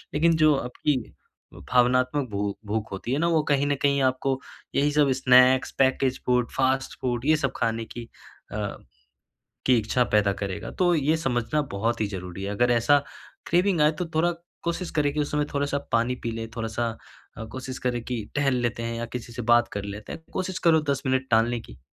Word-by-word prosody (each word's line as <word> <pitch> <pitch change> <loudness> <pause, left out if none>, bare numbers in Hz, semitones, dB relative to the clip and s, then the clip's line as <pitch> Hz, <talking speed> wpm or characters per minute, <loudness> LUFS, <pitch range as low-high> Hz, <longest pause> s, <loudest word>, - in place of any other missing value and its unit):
लेकिन 165 +2 +4
जो 155 -1 +6
आपकी 135 +3 -1 0.6
अ, - - -13
भावनात्मक 125 +2 +2
भू 100 0 -2 0.2
भूख 110 +1 -2
होती 95 +5 -5
है - - +1
ना 170 - +2
वो 160 - +4
कहीं 140 0 +3
न 145 - +1
कहीं 140 -1 +3
आपको 130 +1 +1 0.4
यही 145 +1 +3
सब 145 -2 +3
snacks 130 +1 +6
package 130 -1 +2
food 125 -1 +2
fast 135 0 +1
food 120 -1 -2
ये 155 +1 +5
सब 140 -3 -1
खाने 115 -1 -1
की 120 +1 -8 0.5
अ, - - -3 1.1
कि 130 - +5
इच्छा 115 +3 +1
पैदा 105 -1 +4
करेगा। 100 0 -5
तो 175 -1 +4
ये 155 +1 +2
समझना 130 -1 0
बहुत 110 +4 -1
ही 110 - +2
ज़रूरी 90 -1 -6
है, 100 - -3
अगर 120 +4 +2
ऐसा 120 +5 +4 0.5
क्रेविंग 180 0 +3
आए 150 +1 +5
तो 180 - -1
थोड़ा 165 +2 +3 0.3
कोशिश 170 +1 -2
करें 145 -1 +2
कि 150 - 0
उस 145 - -1
समय 150 0 +1
थोड़ा-सा 140 0 0
पानी 115 +1 +2
पी 115 - -1
ले, 115 0 -4
थोड़ा-सा 115 +1 -2 0.5
अ, 110 - -5
कोशिश 130 0 -6
करें 120 -1 0
कि 120 -3 -3
टहल 140 -2 +2
लेते 120 -1 -1
हैं 115 0 -3
या 115 - -3
किसी 120 -1 -8
से 125 - -4
बात 120 0 +5
कर 100 -1 -4
लेते 100 +1 -7
हैं, 160 - -8
कोशिश 185 0 -3
करो 160 -1 +6
10 140 -1 -1
मिनट 130 0 0
टालने 115 +1 +3
की। - - -14
130 Hz, 205 wpm, -25 LUFS, 115-145 Hz, 1.1 s, जो